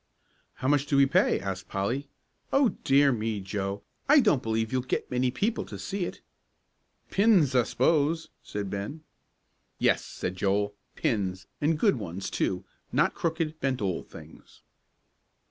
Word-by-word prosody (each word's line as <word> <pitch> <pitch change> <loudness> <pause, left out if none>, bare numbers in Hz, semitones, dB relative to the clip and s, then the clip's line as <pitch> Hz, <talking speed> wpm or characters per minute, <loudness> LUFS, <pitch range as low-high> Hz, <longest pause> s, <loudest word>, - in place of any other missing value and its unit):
"How 130 - -3
much 145 0 +3
do 140 - +2
we 140 - +7
pay?" 170 +7 +3
asked 95 -1 -5
Polly. 120 +9 -2 0.4
"O 275 -3 +4
dear 140 -4 +3
me, 110 -3 -1
Joe, 100 +1 -3 0.3
I 295 +1 +8
don't 205 - +3
b'lieve 110 0 -1
you'll 130 0 +1
get 130 - -3
many 125 0 +2
people 215 - -1
to - - -8
see 195 -2 -3
it." - - -7 0.9
"Pins, 195 - +4
I 125 - +5
s'pose," 155 +6 +1
said 100 -2 -5
Ben. 105 +11 -5 0.7
"Yes," - - +2
said 90 0 -5
Joel, 100 +2 +1 0.2
"pins, 95 -4 -1 0.2
an' 155 +2 +3
good 195 - +3
ones, 95 -3 -5
too, - - -1 0.3
not - - +2
crooked, 165 -1 -2
bent 135 -3 0
old 95 -4 -2
things." - - -14
130 Hz, 150 wpm, -28 LUFS, 100-155 Hz, 0.9 s, I